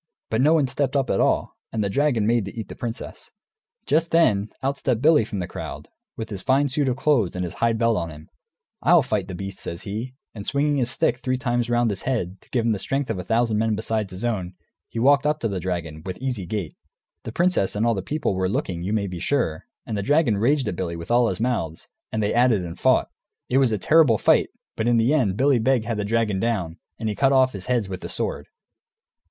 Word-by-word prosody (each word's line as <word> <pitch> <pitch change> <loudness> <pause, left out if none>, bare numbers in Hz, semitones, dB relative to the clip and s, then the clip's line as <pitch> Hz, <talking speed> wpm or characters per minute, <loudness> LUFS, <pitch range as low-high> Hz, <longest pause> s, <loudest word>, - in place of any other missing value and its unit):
But 110 +2 +2
no 155 +4 +5
one 150 -4 +3
stepped 135 +1 -1
up, 135 -3 +1
at - - +1
all. - - +1 0.2
And 110 -2 -1
the - - 0
dragon 130 -2 +1
made 115 -2 +2
to 100 +4 -7
eat 110 - -6
the - - -8
princess. 120 0 -6 0.6
Just 165 +2 +2
then, 110 -12 +3
out 140 +1 -1
stepped 125 -4 0
Billy 150 -1 +5
from 105 -1 -5
the 90 -2 -3
crowd, - - -7 0.3
with 110 0 -6
his 100 -2 -4
fine 140 +2 +2
suit 140 +1 0
of 125 - 0
clothes 135 - +2
and 90 0 -2
his 85 - -6
hide 115 -1 +1
belt 115 0 +2
on 85 - -2
him. 75 0 -12 0.5
"I'll - - +5
fight - - -1
the 90 - -6
beast," 95 +1 -7
he 85 - -5
says, 110 +6 -5 0.2
and 105 - -7
swinging 145 +1 +1
his 125 -3 +1
stick 125 -1 +1
three 130 0 -1
times 120 -2 -1
round 120 -2 +2
his 100 - -4
head, 100 -8 -2
to - - -23
give 120 -3 0
him 115 - +3
the 105 - -1
strength 135 +5 -2
of 100 - -3
a - - -4
thousand 115 +1 +1
men 110 -1 +1
besides 110 -1 -2
his 95 +5 -5
own, 95 -6 -2 0.3
he - - -8
walked 140 +4 +4
up 150 +1 +1
to 115 - +1
the 100 -3 -3
dragon, 85 -3 -4
with 95 0 -5
easy 125 -9 -3
gait. 100 -4 -4 0.5
The - - -6
princess 175 - +1
and 105 +2 +1
all 115 - +3
the 100 - -2
people 145 +1 -1
were 95 0 0
looking, 90 -3 -2
you 95 +4 -2
may 105 -2 +1
be 90 -3 -5
sure, 85 - -1 0.2
and 110 - -4
the 100 - -1
dragon 145 -1 +3
raged 135 +4 +2
at - - -2
Billy 85 -1 -3
with 85 +5 -7
all 120 0 +4
his - - -2
mouths, 110 -10 -2 0.2
and 110 -1 -1
they 105 - 0
at 125 +1 +4
it 100 -5 +1
and 85 -1 -7
fought. - - +3 0.4
It 130 - +3
was 130 -4 +3
a 110 - +1
terrible 150 -1 +4
fight, - - +3 0.3
but 110 - -1
in 120 -1 +4
the 115 +5 +3
end 110 -11 +1
Billy 135 -1 +3
Beg 125 -1 +2
had 115 -2 -2
the 105 - -2
dragon 110 -2 0
down, 95 -7 -2 0.2
and 110 - -3
he 105 - 0
cut 135 +5 +2
off 130 -1 +4
his 95 -2 -7
heads 120 -5 +1
with 95 -1 -6
the - - -6
sword. - - -3
115 Hz, 250 wpm, -23 LUFS, 100-130 Hz, 0.6 s, no